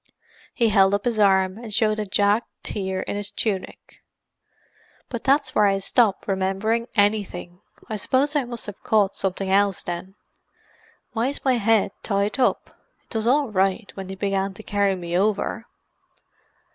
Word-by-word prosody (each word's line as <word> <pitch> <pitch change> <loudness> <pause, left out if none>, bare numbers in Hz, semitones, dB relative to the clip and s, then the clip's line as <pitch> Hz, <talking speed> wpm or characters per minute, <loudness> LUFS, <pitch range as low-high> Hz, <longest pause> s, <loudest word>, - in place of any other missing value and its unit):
He 230 -2 +3
held 195 -1 +4
up 205 - -4
his 235 -3 0
arm, 190 0 +3
and 230 -2 -8
showed 215 0 +1
a 210 - -3
jagged 205 +4 +2 0.2
tear 190 -2 -2
in - - -4
his 205 -1 -3
tunic. 200 -4 -4 1.1
"But 235 -3 -5
that's 275 -1 +2
where 210 - +4
I 195 0 +2
stop 200 +1 +2
remembering 195 +4 0
anything. 205 -4 0 0.3
I 215 - -3
suppose 270 +8 +1
I 285 -4 +2
must 240 -1 -6
have 205 -2 -8
caught 205 -3 +2
something 190 0 -2
else 200 -1 +2
then. 175 +2 -6 1.0
Why 235 +1 0
is 280 +1 -5
my 260 -2 +3
head 225 -2 +2
tied 200 +3 -1
up? 250 - 0 0.4
It - - -7
was 220 0 0
all 275 -1 +2
right 195 +1 0
when 195 -1 -7
they 190 - -6
began 195 0 -1
to 220 - -11
carry 200 -2 +1
me 175 -1 -4
over." 210 +3 0
205 Hz, 165 wpm, -23 LUFS, 195-225 Hz, 1.1 s, held